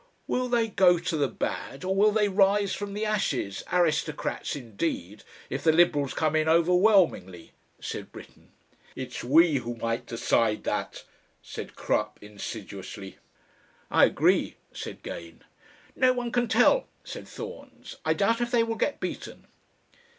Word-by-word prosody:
"Will 250 0 -1
they 235 -2 +2
go 185 -4 +4
to 170 0 -2
the 145 -2 +2
bad, 135 +3 -4
or 190 +1 0
will 210 +2 +5
they 210 -1 +2
rise 200 0 +3
from 205 -1 -5
the 215 +1 -1
ashes, 155 - -1
aristocrats 155 -5 0
indeed 110 - -4 0.2
if 140 - -4
the 160 - +5
Liberals 155 -4 +3
come 155 -1 +1
in 155 0 +2
overwhelmingly?" 170 - +3 0.3
said - - -6
Britten. - - -14 0.5
"It's 130 -1 -6
we 155 +4 +5
who 120 -1 -4
might 115 0 -3
decide 115 -1 +1
that," - - -3 0.4
said - - -8
Crupp, - - -1
insidiously. 100 -1 -8 0.7
"I - - +6
agree," - - +2 0.2
said - - -8
Gane. 85 -1 -8 0.5
"No 255 0 +4
one 245 -1 -3
can 245 0 +1
tell," - - +4 0.2
said - - -8
Thorns. 460 +1 -9
"I - - +1
doubt 230 +1 +1
if 240 - 0
they 240 -2 +3
will 230 0 -2
get 285 - -1
beaten." - - -6
170 Hz, 145 wpm, -27 LUFS, -, 0.7 s, I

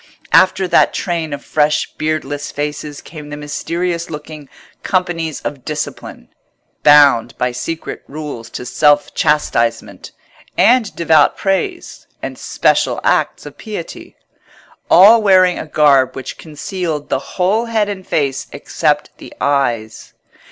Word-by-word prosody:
After 185 0 +4
that - - +3
train 170 -4 -2
of 145 0 -6
fresh 150 0 0
beardless 145 -2 -3
faces 150 0 -5
came 150 -2 -10
the 145 - -6
mysterious 170 +3 -3
looking 150 -2 -9 0.3
Companies 175 -5 -2
of 140 -3 -6
Discipline, 150 -1 -6 0.5
bound 140 -6 +5
by 125 0 0
secret 160 +7 -5
rules 140 -6 -7
to 125 - -7
self 145 +2 +2
chastisement, 150 -6 -1 0.5
and 240 -3 +3
devout 160 -3 +3
praise, 210 - -3
and - - -6
special - - 0
acts - - 0
of - - -11
piety; 210 -7 -8 0.7
all 215 +6 +7
wearing 185 -3 +4
a - - -6
garb 140 -4 +3
which 135 -1 -7
concealed 160 0 -5
the - - 0 0.2
whole 200 +6 +1
head 220 -3 0
and 195 -2 -6
face 140 -3 -1
except - - -1
the - - -11
eyes. 120 -6 -1
155 Hz, 125 wpm, -17 LUFS, 145-180 Hz, 0.7 s, all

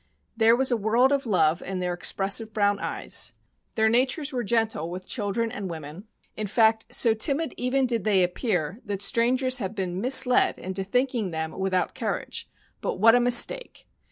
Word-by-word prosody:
,There 225 0 +4
was 265 +1 +1
a 240 - +2
world 230 +5 +2
of 275 -3 -1
love 170 -5 +1
in 190 0 -5
their 180 -1 -2
expressive 195 +5 -1
brown 205 -1 +1
eyes, - - -2 0.4
their 220 -1 +2
natures 260 +5 0
were 245 -1 -2
gentle 225 -7 -1
with 185 +1 -8
children 225 0 -2
and 200 -3 -6
women— 160 +4 -9 0.3
in 215 -1 -4
fact, 220 +1 +2
so 230 - +2
timid 285 +8 -1
even 260 +2 0
did 235 -5 -2
they 195 -3 +2
appear 180 - -2
that 200 -2 -4
strangers 255 +4 +2
have 200 -1 -5
been 185 -1 -3
misled 255 0 +4
into 190 +1 -5
thinking 240 0 -1
them 160 -1 -4
without 190 -1 -2
courage; - - -5 0.3
but - - -3
what 225 +4 +5
a 245 - +4
mistake 245 - +3
220 Hz, 175 wpm, -25 LUFS, 190-245 Hz, 0.4 s, what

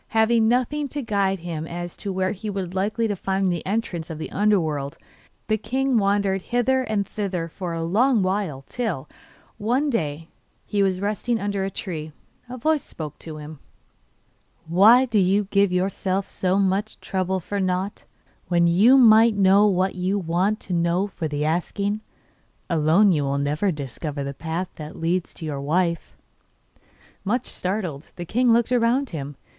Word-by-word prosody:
Having 220 0 +4
nothing 255 +5 +1
to 285 +1 -4
guide 195 -4 0
him 165 -2 -5
as 175 0 -6
to 200 - -4
where 185 0 0
he 210 +1 -5
was 190 -3 -4
likely 215 +4 0
to 205 - -1
find 190 0 0
the 170 -2 -3
entrance 190 -6 -2
of 160 - -5
the 155 - -6
under 210 0 +3
world, 145 -4 -3 0.5
the 215 -1 0
king 265 +3 0
wandered 200 -2 +2
hither 245 +5 +1
and 215 -5 -1
thither 190 -5 -3
for 175 +1 -5
a 165 0 -3
long 220 +6 +3
while, 185 -8 -2
till, 205 - -3 0.5
one 255 +7 +1
day, 150 - -1
while 165 - -18 0.4
he 205 -2 0
was 190 -2 +1
resting 215 +3 -1
under 200 -1 -2
a 195 - -1
tree, 160 -5 -6 0.4
a 255 - -6
voice 310 +4 +1
spoke 150 -2 -8
to 160 -2 -8
him. 150 0 -9 1.1
'Why 215 +10 +6
do 225 -4 +1
you 195 +2 +3
give 200 -1 +3
yourself 190 +1 0
so 185 0 -1
much 200 +2 0
trouble 190 0 -1
for 200 +3 -4
nought, 185 +1 -2 0.4
when 170 -1 +3
you 200 +10 +6
might 225 -2 +7
know 200 +1 +5
what 190 -1 +1
you 185 +2 -1
want 185 +4 0
to 185 - -5
know 170 +2 +1
for 185 -5 -4
the 150 0 -2
asking? 200 +6 -1 0.7
Alone 165 +6 +4
you 155 -4 +2
will 140 0 -1
never 150 +8 0
discover 145 0 -5
the 140 0 -4
path 165 +5 -4
that 155 0 -8
leads 170 +2 -1
to 160 - -8
your 145 -3 -4
wife.' 170 +3 -1 1.1
Much 240 +5 0
startled, 180 -6 -4
the 175 - -6
king 245 +6 +2
looked 235 +1 +3
about 245 +2 +2
him. 145 -3 -5
190 Hz, 170 wpm, -23 LUFS, 170-215 Hz, 1.1 s, might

